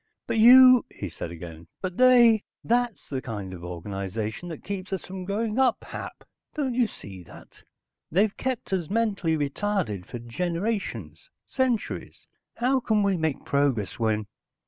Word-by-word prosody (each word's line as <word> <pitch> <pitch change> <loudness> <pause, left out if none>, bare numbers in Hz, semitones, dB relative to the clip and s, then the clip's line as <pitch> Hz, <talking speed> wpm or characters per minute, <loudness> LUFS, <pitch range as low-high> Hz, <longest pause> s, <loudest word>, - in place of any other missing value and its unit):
"But 225 - -1
you...." 255 +2 +9
he 100 - -7
said 85 - -6
again. 85 -1 -10
"But 185 -2 -4
they.... 240 -4 +6 0.2
That's 240 -1 0
the 135 -2 -3
kind 105 -8 -6
of 85 -2 -9
organization 100 - -5
that 160 - -8
keeps 195 -1 -5
us 190 - -3
from 185 0 -7
growing 215 +4 -1
up, 255 -3 +2
Hap. - - -8 0.3
Don't 275 -5 -1
you 240 -1 +2
see 95 - -10
that? - - -15 0.5
They've 200 +5 +2
kept 255 -6 -3
us 175 -5 -1
mentally 200 -7 0
retarded 145 - -2
for - - -6
generations, 180 - -4 0.2
centuries. 255 -4 -2 0.3
How 260 +2 +2
can 220 -4 +1
we 200 -1 +2
make 160 -4 -2
progress 140 -9 0
when...." 110 -2 0
185 Hz, 150 wpm, -26 LUFS, -, 0.5 s, you